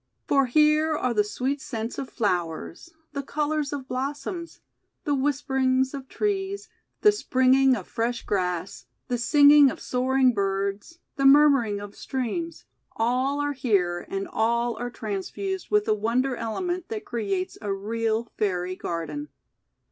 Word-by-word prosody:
For 275 -2 +3
here 305 +3 +3
are 250 -4 0
the 210 -2 +3
sweet 260 +7 -2
scents 225 0 -5
of 270 - -5
flowers, 175 - -2 0.2
the 280 - -2
colours 295 +1 -1
of 275 -3 -5
blossoms, 290 +7 -4 0.4
the 290 - 0
whisperings 265 -1 +1
of 270 -2 -7
trees, 400 -1 -2 0.3
the 420 - +7
springing 260 -8 +3
of 195 -6 -7
fresh 235 +1 -2
grass, 180 -2 -2 0.2
the 245 -1 -1
singing 285 +3 +7
of - - -6
soar 255 +1 -1
ing 260 -2 +5
birds, 200 - -2 0.2
the 275 - +1
murmuring 275 -7 +5
of 205 0 -9
streams, 270 +7 -4 0.3
all 255 +5 +1
are 290 0 -1
here, 195 -9 0
and 195 0 -3
all 235 +1 0
are 245 0 -3
transfused 240 - -4
with 420 0 +2
a - - +4
wonder 240 +5 0
element 350 - -3
that 430 -2 -5
creates 195 - -3
a 205 -2 -3
real 225 +3 -1
Fairy 185 -3 -1
Garden. 180 - -5
255 Hz, 145 wpm, -25 LUFS, 210-290 Hz, 0.4 s, the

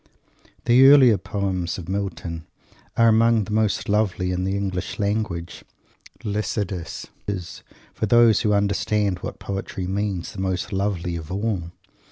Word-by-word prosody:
The 125 +3 +7
earlier 130 -7 +7
poems 95 -4 -2
of 90 -3 -8
Milton 90 -4 -4 0.5
are 115 - +5
among 115 0 +4
the 105 - -8
most 110 -1 +1
lovely 100 -3 +1
in 90 0 -1
the 95 +1 -1
English 95 -3 -3
language. 100 -5 -2 0.6
Lycidas 100 -3 -3 0.2
is, 90 -4 -5 0.3
for 110 - -2
those 115 -1 +5
who 105 - +1
understand 100 -1 +1
what - - -6
poetry 95 -1 -5
means, 95 -1 -2
the 95 - -5
most 95 0 -2
lovely 95 -3 -1
of 80 0 -7
all. 100 -3 -2
100 Hz, 140 wpm, -23 LUFS, 90-105 Hz, 0.6 s, The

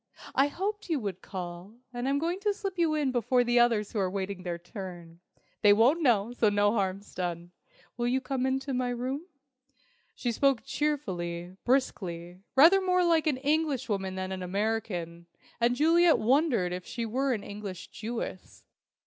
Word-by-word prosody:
"I 270 +1 +4
hoped 400 +6 -4
you 315 -4 +1
would 200 -5 -5
call, 180 +2 -7 0.2
and 245 +2 -2
I'm 280 - +2
going 340 +5 -1
to 410 0 0
slip 390 -3 -5
you 325 -2 +2
in 290 -4 +1
before 245 +1 +2
the 240 0 +3
others 230 -4 +3
who 215 - -2
are 190 -2 +1
waiting 195 0 -4
their 175 -2 -3
turn. 175 -2 -9 0.4
They 205 -1 +7
won't 250 +11 +4
know, 235 -5 +2
so 230 -3 +3
no 205 0 +3
harm's 200 -2 -2
done! 175 -1 -4 0.5
Will 240 0 0
you 255 +2 +2
come 265 0 -2
into 270 +1 -1
my 250 0 0
room?" 260 +7 -3 0.9
She 240 - -1
spoke 270 +1 +2
cheerfully, 185 - -3
briskly, 180 -9 -1 0.2
rather 335 +8 +7
more 365 -1 +2
like 330 -2 +3
an 290 -4 +2
Englishwoman 260 -10 -1
than 190 0 -4
an 190 -1 -4
American, 180 -3 -2 0.3
and 240 +1 +3
Juliet 330 +4 +5
wondered 245 - +2
if 180 0 -5
she 235 +4 -4
were 260 +4 0
an 205 - -6
English 200 -3 -7
Jewess. 225 -4 -6
235 Hz, 170 wpm, -29 LUFS, 190-275 Hz, 0.9 s, They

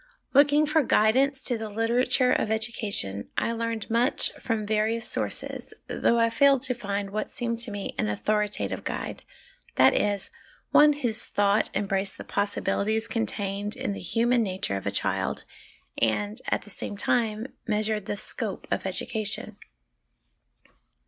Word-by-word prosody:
Looking 290 +2 +6
for 310 +2 +3
guidance 265 +3 +3
to 245 -3 -2
the 220 -1 -4
literature 240 +4 +2
of - - +1
education, 215 - -1
I - - +1
learned 230 -2 -2
much 235 +5 +1
from 225 -3 -2
various 220 +2 0
sources, - - -4
though 235 - +2
I 230 0 +3
failed 275 +2 +4
to 250 - -1
find 200 -4 -3
what 215 +1 -2
seemed 235 -2 -3
to 240 0 -6
me 205 -1 -4
an 105 - +1
authoritative 210 - -1
guide, - - -4 0.5
that - - +6
is, 205 -1 0 0.4
one 295 0 +7
whose 240 -7 -2
thought 205 +1 +2
em 200 +1 +1
braced 195 0 -1
the - - -7
possibilities 205 +2 0
contained 205 -2 -2
in 260 -5 -2
the - - -6
human 235 +6 +2
nature 185 - -1
of 95 - -4
a - - +3
child, - - 0 0.6
and, 205 - 0
at - - 0
the 210 - -10
same 200 - -5
time, 225 +2 0
measured 215 -1 0
the 205 - -2
scope - - -5
of - - 0
education. 215 -2 -2
220 Hz, 150 wpm, -27 LUFS, 205-240 Hz, 0.6 s, one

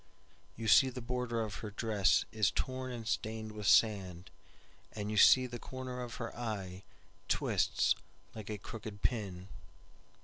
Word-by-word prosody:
You 115 0 -5
see 130 +5 +7
the 130 0 -7
border 125 -1 -2
of 105 -3 -5
her 110 - -5
dressIs 105 -1 +2
torn 130 +6 -3
and 115 -2 -6
stained 110 -1 -2
with 105 -1 -5
sand, 95 -5 +3 0.6
And 105 -1 -4
you 105 - -2
see 130 +5 +7
the 120 -1 -6
corner 130 0 -6
of 120 -2 -6
her 115 -2 -5 1.0
eyeTwists - - +2 0.4
like 110 -2 -8
a 105 - -3
crooked 105 0 -9
pin." 95 -6 -2
110 Hz, 140 wpm, -33 LUFS, 105-125 Hz, 1.0 s, see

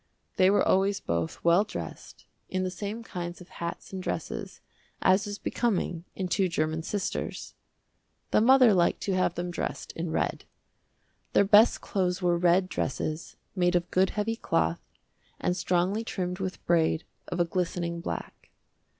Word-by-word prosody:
They 185 0 +6
were 205 - +3
always 195 +1 +3
both 85 -1 -3
well 170 +4 +5
dressed, 215 - -8 0.2
in 185 0 -1
the 185 - -2
same 205 +5 -5
kinds 175 -4 -6
of 180 - -13
hats 170 +3 -6
and 190 - -4
dresses, - - -4 0.4
as 190 +2 +3
is 205 0 -4
becoming 185 -9 -1
in 190 - -2
two 185 +1 +1
german 155 -1 -1
sisters. 195 +3 -3 0.8
The - - +4
mother 255 -1 +7
liked 175 -2 +2
to 195 - -1
have 185 0 +1
them 175 0 -3
dressed - - -4
in 165 0 -4
red. 160 - -1 0.9
Their 200 - +5
best 210 +3 +6
clothes 180 -2 -1
were 175 -2 +2
red 180 +1 +4
dresses, 155 +1 -3 0.2
made 175 -1 +2
of 175 -1 0
good 185 +1 +3
heavy 215 +2 -2
cloth, 80 - 0 0.6
and 180 - 0
strongly 185 +4 +1
trimmed 180 -4 -3
with 190 -1 -5
braid 165 -1 +2 0.2
of 175 - -4
a 175 - +4
glistening 170 -1 -2
black. - - -6
180 Hz, 160 wpm, -28 LUFS, 170-195 Hz, 0.9 s, mother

